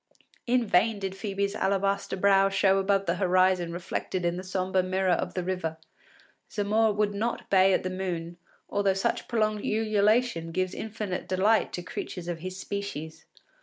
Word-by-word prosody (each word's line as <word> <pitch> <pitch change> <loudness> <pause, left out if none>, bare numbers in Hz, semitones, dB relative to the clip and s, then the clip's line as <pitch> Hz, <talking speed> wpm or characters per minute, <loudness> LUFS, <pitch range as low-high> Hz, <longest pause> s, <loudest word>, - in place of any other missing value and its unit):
In 245 0 +2
vain 210 +3 +3
did 195 -1 -4
Phœbe’s 200 0 -2
alabaster 195 0 0
brow 195 0 +4
show 195 0 +3
above 195 0 +1
the 170 0 0
horizon 185 -2 +2
reflected 175 +1 -3
in 170 0 +1
the 185 - -5
sombre 185 0 0
mirror 185 0 0
of - - -1
the 180 - -1
river; 175 -3 -3 0.7
Zamore 215 +1 +2
would 205 0 0
not 225 +4 -3
bay 190 0 +6
at - - +2
the 185 - -2
moon, 175 -2 -4 0.3
although 200 -1 +1
such 195 - -1
prolonged 215 -3 0
ululation 215 -4 +1
gives 185 +2 -1
infinite 210 -4 -4
delight 200 +4 +2
to 180 - -4
creatures 175 0 -6
of 175 -2 -3
his 185 +2 -6
species. 185 -6 -5
190 Hz, 165 wpm, -27 LUFS, 185-205 Hz, 0.7 s, bay